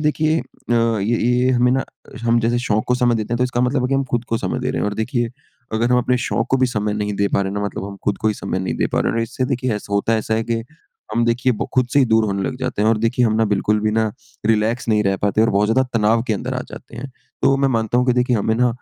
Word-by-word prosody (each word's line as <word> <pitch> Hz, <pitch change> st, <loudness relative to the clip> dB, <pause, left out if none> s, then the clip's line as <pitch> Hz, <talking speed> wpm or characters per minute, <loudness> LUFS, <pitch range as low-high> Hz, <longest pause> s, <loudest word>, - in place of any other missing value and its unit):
देखिए 155 Hz, +1 st, +1 dB
अ, -, -, -7 dB, 0.3 s
ये 115 Hz, -1 st, +1 dB
ये 125 Hz, +2 st, +2 dB
हमें 125 Hz, -1 st, +3 dB
ना 135 Hz, -, +1 dB, 0.4 s
हम 120 Hz, 0 st, +3 dB
जैसे 120 Hz, +1 st, +1 dB
शौक़ 110 Hz, -3 st, 0 dB
को 125 Hz, -, +3 dB
समय 125 Hz, -1 st, +2 dB
देते 110 Hz, +1 st, -3 dB
हैं -, -, +2 dB
तो 125 Hz, -, +2 dB
इसका 125 Hz, -1 st, -1 dB
मतलब 125 Hz, +1 st, +1 dB
है 125 Hz, -, 0 dB
कि 135 Hz, -, 0 dB
हम 135 Hz, 0 st, +1 dB
खुद 120 Hz, 0 st, 0 dB
को 115 Hz, -, 0 dB
समय 125 Hz, -, -2 dB
दे 130 Hz, -, -1 dB
रहे -, -, -2 dB
हैं। -, -, 0 dB
और 105 Hz, -, -4 dB
देखिए 120 Hz, +1 st, -1 dB, 0.4 s
अगर 115 Hz, +2 st, +1 dB
हम 125 Hz, -, +5 dB
अपने 125 Hz, +1 st, +1 dB
शौक़ 115 Hz, +1 st, 0 dB
को 135 Hz, -, +4 dB
भी 130 Hz, 0 st, +3 dB
समय 105 Hz, -3 st, -1 dB
नहीं 105 Hz, 0 st, -2 dB
दे 100 Hz, 0 st, +1 dB
पा -, -, +1 dB
रहे 95 Hz, -, -1 dB
हैं 100 Hz, -, -2 dB
ना 100 Hz, -, -2 dB
मतलब 100 Hz, -, -4 dB
हम 100 Hz, -1 st, -8 dB
खुद 105 Hz, -, 0 dB
को 110 Hz, -, +1 dB
ही 105 Hz, -, 0 dB
समय 95 Hz, -, -3 dB
नहीं 95 Hz, -, -2 dB
दे -, -, +1 dB
पा -, -, +2 dB
रहे -, -, +1 dB
हैं -, -, -3 dB
और 115 Hz, -, +1 dB
इससे 125 Hz, +3 st, -3 dB
देखिए 130 Hz, -2 st, -1 dB
ऐसा 100 Hz, 0 st, -7 dB
होता 100 Hz, +3 st, +2 dB
ऐसा 110 Hz, 0 st, -1 dB
है 110 Hz, 0 st, 0 dB
कि 115 Hz, -1 st, -2 dB, 0.5 s
हम 115 Hz, +1 st, +2 dB
देखिए 125 Hz, +2 st, +1 dB
ब 105 Hz, -, -3 dB
खुद 130 Hz, -1 st, +3 dB
से 145 Hz, -, +4 dB
ही 135 Hz, -, +5 dB
दूर 110 Hz, -1 st, +3 dB
होने 100 Hz, -1 st, -1 dB
लग 130 Hz, -, -5 dB
जाते 125 Hz, -5 st, -2 dB
हैं। 110 Hz, -, +3 dB
और 110 Hz, -1 st, +2 dB
देखिए 115 Hz, +2 st, +1 dB
हम 110 Hz, -, +1 dB
ना 115 Hz, -, +3 dB
बिल्कुल 105 Hz, +1 st, +1 dB
भी 110 Hz, 0 st, +1 dB
ना 110 Hz, 0 st, +1 dB, 0.4 s
रिलैक्स 115 Hz, +2 st, +1 dB
नहीं 105 Hz, -1 st, +3 dB
रह 95 Hz, 0 st, +1 dB
पाते 100 Hz, +1 st, +2 dB
और 115 Hz, -, +3 dB
बहुत 105 Hz, +2 st, +2 dB
ज़्यादा 130 Hz, +3 st, +3 dB, 0.2 s
तनाव 110 Hz, +2 st, +3 dB
के -, -, +2 dB
अंदर -, -, -4 dB
आ -, -, -2 dB
जाते -, -, -11 dB
हैं। 135 Hz, +2 st, -7 dB, 0.3 s
तो 135 Hz, 0 st, +4 dB
मैं 135 Hz, 0 st, +2 dB
मानता 115 Hz, 0 st, 0 dB
हूँ 125 Hz, -, +2 dB
कि 125 Hz, -, +4 dB
देखिए 125 Hz, -1 st, +2 dB
हमें 110 Hz, +2 st, +1 dB
ना 125 Hz, +1 st, +3 dB
115 Hz, 315 wpm, -20 LUFS, 105-125 Hz, 0.5 s, हम